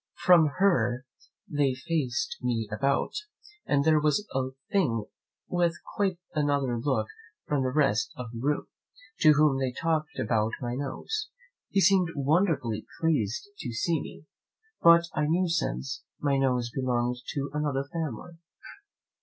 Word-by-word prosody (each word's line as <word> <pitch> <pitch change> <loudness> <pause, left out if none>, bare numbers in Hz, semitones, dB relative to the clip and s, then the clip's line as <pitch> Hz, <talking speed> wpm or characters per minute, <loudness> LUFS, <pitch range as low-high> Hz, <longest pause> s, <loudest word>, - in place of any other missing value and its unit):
From 170 -3 +6
her 130 - +2 0.4
they 145 -3 +1
faced 160 +3 -2
me 120 -3 -1
about, 140 +4 +1 0.6
and 140 -1 +3
there 155 -1 +5
was 155 +8 +1
a 130 -1 0 0.2
thing 120 - +1 0.4
with 175 -1 +1 0.2
quite 195 -3 +1 0.2
another 140 -5 +1
look 125 -4 0 0.4
from 145 -2 0
the 130 - +1
rest 130 -5 +2
of 125 -3 -6
the 115 - -7
room, 145 +4 0 0.5
to 155 -1 +7
whom 150 -2 +3
they 130 -1 0
talked 155 +2 -1
about 110 -1 0
my 120 -2 -3
nose. 145 - -4 0.4
He 195 - +2
seemed 185 -2 +4
wonderfully 140 - +1
pleased 155 - 0
to 120 - -4
see 160 +7 0
me; - - -10 0.6
but 170 0 +7
I 150 -1 0
knew 175 +4 +2
since, 145 -4 -2 0.2
my 140 -1 +1
nose 125 -3 +1
belonged 125 -2 0 0.2
to 140 0 -2
another 145 -2 0
family. 165 +1 -5
145 Hz, 140 wpm, -28 LUFS, 125-165 Hz, 0.6 s, to